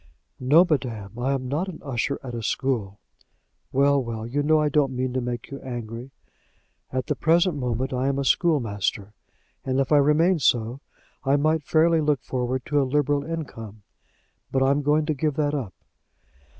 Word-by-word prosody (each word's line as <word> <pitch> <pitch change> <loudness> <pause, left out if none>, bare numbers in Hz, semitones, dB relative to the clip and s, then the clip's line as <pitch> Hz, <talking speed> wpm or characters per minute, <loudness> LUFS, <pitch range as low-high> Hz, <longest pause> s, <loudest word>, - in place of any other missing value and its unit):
"No, 150 +8 +5
madam, 115 - -2
I 130 +3 0
am 130 -2 -3
not 150 +8 -1
an 185 - -7
usher 135 0 -2
at 125 -2 -6
a 115 - -4
school." 110 -4 -2 0.7
"Well, 140 0 +3
well, 115 -2 -5
you 135 +5 -1
know 155 +2 +3
I 150 - +2
don't 140 -3 +1
mean 130 0 -2
to 130 - 0
make 120 0 -5
you 140 - -6
angry." 120 0 -6 0.8
"At 130 -1 -2
the - - 0
present 170 +1 +3
moment, 125 0 -2
I 130 +1 0
am 140 0 0
a 140 - -1
schoolmaster, 110 - 0 0.5
and 130 0 0
if 135 +1 0
I 150 - +6
remained 155 +4 +3
so, 120 +1 +1 0.4
I 135 0 +3
might 155 +2 +2
fairly 160 +2 +3
look 150 -3 +1
forward 130 0 -2
to 145 -3 +2
a 135 - -1
liberal 145 0 +1
income. 115 -10 -7 0.7
But 135 0 +2
I 135 - +4
am 140 +1 +1
going 150 +2 +2
to 155 - 0
give 150 0 -1
that 145 -1 0
up." 130 -10 -4
135 Hz, 185 wpm, -24 LUFS, 125-150 Hz, 0.8 s, I